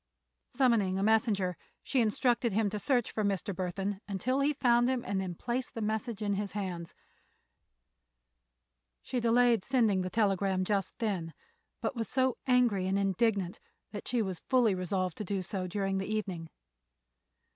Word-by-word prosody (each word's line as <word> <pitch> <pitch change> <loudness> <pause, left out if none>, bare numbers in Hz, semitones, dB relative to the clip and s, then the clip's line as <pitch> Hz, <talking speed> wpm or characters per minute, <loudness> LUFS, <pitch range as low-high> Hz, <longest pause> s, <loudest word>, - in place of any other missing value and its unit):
Summoning 225 -8 +2
a 195 - 0
messenger 210 -4 +2 0.3
she 265 - +1
instructed 235 +1 +1
him 210 -1 +1
to 210 - -3
search 245 -1 +1
for 215 - -1
Mr. 200 -1 -1
Burthon 190 +2 -3
until 230 +7 -1
he 285 +2 +2
found 240 -1 +3
him 255 -2 -1
and 195 0 -1
then 180 -2 -4
place 245 +6 -2
the - - -7
message 220 0 -2
in 205 -1 +1
his 200 0 -3
hands. 180 -5 -4 2.1
She 250 - -2
delayed 235 -2 +4
sending 225 -8 +2
the 185 - -2
telegram 195 -3 +1
just 200 -2 -1
then, 185 -8 -2 0.5
but - - -2
was 230 -2 -3
so 260 -1 +2
angry 240 -7 +3
and 195 +1 +1
indignant 195 -1 +1 0.3
that 205 -2 -7
she 240 -3 +1
was 185 -3 -4
fully 245 -5 +4
resolved 185 -1 -2
to - - -3
do 195 -1 -2
so 185 0 -3
during 195 +1 -1
the 195 +2 -4
evening. 185 -7 -3
205 Hz, 160 wpm, -31 LUFS, 190-235 Hz, 2.1 s, delayed